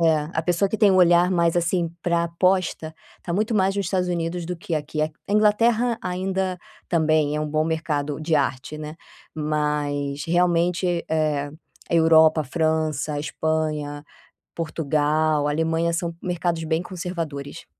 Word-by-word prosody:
É. 155 -2 +2
A 160 - +1
pessoa 175 +4 +1
que 220 - -2
tem 210 -1 +5
um 190 - +3
olhar 175 0 +5
mais, 170 -2 +2
assim, 170 0 +1
para 170 -1 +1
aposta, 170 -2 0 0.3
tá 170 - -4
muito 215 +4 0
mais 195 -1 +2
nos 200 - -1
Estados 180 -2 0
Unidos 170 0 -2
do 180 +1 -4
que 170 -1 -4
aqui. 150 0 -3
Aqu 155 0 -2
É 200 - -2
a - - +3
Inglaterra 230 +3 +3
ainda 185 0 -2 0.3
também 155 -3 +2
é - - -1
um 155 - -2
bom 155 +1 +1
mercado 155 -3 -2
de 155 0 0
arte, 140 0 -1
né. 155 +1 -7 0.4
Mas 150 -2 -1
realmente, 175 0 +1
eh, 155 -2 0 0.4
a - - +1
Europa, 160 -1 +5
França, 155 0 -1
Espanha, 150 -1 -2 0.5
Portugal, 155 -1 0
Alemanha 160 +2 0
são 170 0 -2
mercados 175 -2 -2
bem 160 +2 0
conservadores. 165 -6 -6
165 Hz, 155 wpm, -23 LUFS, 155-180 Hz, 0.5 s, tem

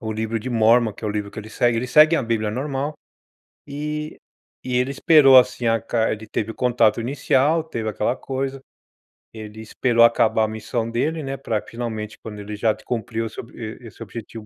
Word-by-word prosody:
o 110 -2 -4
livro 110 +1 -2
de 125 +4 -6
Mormon, 115 -1 +3
que 110 - -11
é - - 0
o - - -1
livro 105 -1 -3
que - - -10
ele 110 - -12
segue, 120 +1 +1
eles 125 +2 -3
seguem 155 +2 +6
a - - -1
bíblia 115 -2 -1
normal. 140 +3 -3 0.7
E 150 +2 -5 0.5
e 125 -1 -3
ele 125 +2 0
esperou, 140 -3 +7
assim, 125 -1 -1
a 115 0 +2
ca 115 0 0
ele 110 0 -5
teve 110 +1 -3
o - - -14
contato 120 -2 +2
inicial, 140 +5 +1
teve 115 -8 -4
aquela 105 +4 -1
coisa, 135 0 -4 0.7
ele 110 0 -9
esperou 115 +2 +2
acabar 115 -1 +3
a - - +1
missão 110 +1 -3
dele, 150 +7 -1
né, 135 0 -4
pra, 115 -6 -2
finalmente, 110 -3 -5
quando 105 -2 -8
ele 105 +1 -6
já 110 0 +1
cumpriu 115 -1 -3
esse 110 - -8
ob 115 - -16
e 115 +2 -7
e - - -9
esse 115 - -10
objetivo 110 +1 -9
115 Hz, 210 wpm, -22 LUFS, 110-130 Hz, 0.7 s, esperou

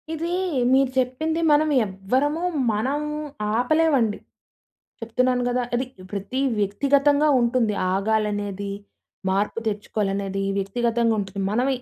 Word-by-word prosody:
ఇది 330 +2 -3 0.4
మీరు 265 -1 +3
చెప్పింది 315 +6 -1
మనం 305 +1 +4 0.2
ఎవ్వరము 255 - -1 0.3
మనం 260 +8 -1 0.6
ఆపలేమండి. 260 -4 +2 0.8
చెప్తున్నాను 250 +2 +1
గదా. 245 0 0
అది 255 +2 0 0.3
ప్రతి 200 +6 -3 0.2
వ్యక్తిగతంగా 280 +8 +3
ఉంటుంది 235 -3 +1 0.2
ఆగాలనేది, 205 -1 -1 0.6
మార్పు 200 +4 0
తెచ్చుకోవాలనేది 200 -2 -2
వ్యక్తిగతంగా 230 +3 +1
ఉంటుంది. 195 0 -4
మనం 245 +5 +1
235 Hz, 95 wpm, -23 LUFS, 205-270 Hz, 0.8 s, మనం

